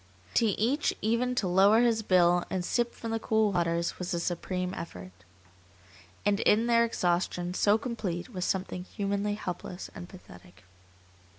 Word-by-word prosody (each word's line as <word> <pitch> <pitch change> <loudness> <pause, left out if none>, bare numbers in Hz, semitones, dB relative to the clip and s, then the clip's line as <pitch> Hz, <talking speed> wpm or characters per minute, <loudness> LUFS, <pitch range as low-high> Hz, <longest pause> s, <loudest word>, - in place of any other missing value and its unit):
To 230 - +3
each 235 +8 +1
even 235 +3 +1
to 205 - 0
lower 195 +5 +5
his 230 -2 +2
bill 175 -3 +4
and 180 -2 -2
sip 240 +3 0
from 230 - -6
the 225 - -1
cool 220 -1 +2
waters 170 -2 -1
was 180 0 -2
a - - -1
supreme 180 +1 -3
effort. 90 - -8 1.1
And 205 0 +2
in 220 +3 +3
their 235 -1 +4
exhaustion 175 -4 -1
so 205 +3 +3
complete 220 -6 -4
was 185 -6 -4
something 185 -1 -2
humanly 200 +1 -2
helpless 180 -2 -6
and 175 - -9
pathetic. 95 - -15
190 Hz, 155 wpm, -29 LUFS, 175-225 Hz, 1.1 s, lower